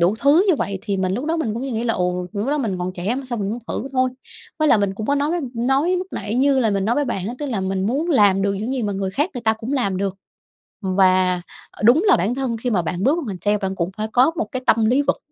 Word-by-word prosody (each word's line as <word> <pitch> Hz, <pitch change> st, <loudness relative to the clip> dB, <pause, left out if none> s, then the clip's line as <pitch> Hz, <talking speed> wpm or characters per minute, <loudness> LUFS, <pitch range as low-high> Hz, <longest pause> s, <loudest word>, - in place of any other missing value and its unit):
đủ 175 Hz, +5 st, +3 dB
thứ 300 Hz, +7 st, +5 dB
như 355 Hz, -, +5 dB
vậy?" 195 Hz, -1 st, -2 dB
Thì 200 Hz, -3 st, -2 dB
mình 190 Hz, 0 st, 0 dB
lúc 255 Hz, -, -3 dB
đó 325 Hz, +2 st, 0 dB
mình 225 Hz, -9 st, -2 dB
cũng 235 Hz, -, -4 dB
suy 270 Hz, -, -3 dB
nghĩ 230 Hz, +1 st, -2 dB
là 230 Hz, -, +1 dB
"Ồ! 180 Hz, 0 st, -1 dB
Lúc 205 Hz, +3 st, -2 dB
đó 295 Hz, +1 st, +1 dB
mình 205 Hz, -8 st, -2 dB
còn 180 Hz, +1 st, -3 dB
trẻ 190 Hz, +7 st, -2 dB
mà 275 Hz, -, -4 dB
sao 240 Hz, -, -3 dB
mình 200 Hz, -1 st, -2 dB
không 235 Hz, +3 st, -4 dB, 0.2 s
thử 270 Hz, -, -6 dB
thôi." 255 Hz, -1 st, +2 dB, 0.5 s
Với 310 Hz, -1 st, +3 dB
lại 220 Hz, -, +5 dB
mình 200 Hz, -1 st, 0 dB
cũng 215 Hz, +1 st, -5 dB
có 285 Hz, -, +2 dB
nói 290 Hz, +2 st, 0 dB
với 350 Hz, 0 st, 0 dB
nói 270 Hz, +9 st, +1 dB
lúc 365 Hz, -, -4 dB
nãy 210 Hz, +2 st, -4 dB
như 270 Hz, +1 st, +3 dB
là 225 Hz, -3 st, +2 dB
mình 195 Hz, -1 st, 0 dB
nói 235 Hz, +3 st, +1 dB
với 290 Hz, -, +1 dB
bạn 195 Hz, -7 st, -3 dB
á, 240 Hz, -, -4 dB
tức 295 Hz, -, -3 dB
là 225 Hz, -7 st, -2 dB
mình 190 Hz, 0 st, -1 dB
muốn 295 Hz, +9 st, -1 dB
làm 200 Hz, -7 st, +4 dB
được 200 Hz, 0 st, +1 dB
những 220 Hz, +6 st, -3 dB
gì 250 Hz, -, -2 dB
mà 205 Hz, -1 st, -1 dB
người 195 Hz, -1 st, -2 dB
khác 295 Hz, -, 0 dB
người 245 Hz, -, -4 dB
ta 220 Hz, -1 st, +3 dB
cũng 225 Hz, +4 st, -5 dB
làm 200 Hz, -9 st, 0 dB
được. 195 Hz, 0 st, -2 dB, 0.7 s
Và, 185 Hz, -1 st, +3 dB, 0.3 s
ờ, -, -, -11 dB
đúng 260 Hz, -, +5 dB
là 390 Hz, -, +6 dB
bản 215 Hz, +8 st, 0 dB
thân 255 Hz, -4 st, -2 dB
khi 245 Hz, +2 st, -2 dB
mà 190 Hz, -6 st, +1 dB
bạn 175 Hz, +3 st, -3 dB
bước 285 Hz, +5 st, +3 dB
vào 340 Hz, -, -3 dB
ngành 190 Hz, -3 st, -4 dB
sale 210 Hz, 0 st, +3 dB
bạn 195 Hz, -1 st, -3 dB
cũng 175 Hz, -1 st, -1 dB
phải 215 Hz, +1 st, -2 dB
có 255 Hz, +6 st, +5 dB
một 220 Hz, -, -1 dB
cái 255 Hz, -, -3 dB
tâm 225 Hz, 0 st, +3 dB
lý 255 Hz, +5 st, +3 dB
vực, -, -, 0 dB
220 Hz, 315 wpm, -21 LUFS, 195-270 Hz, 0.7 s, là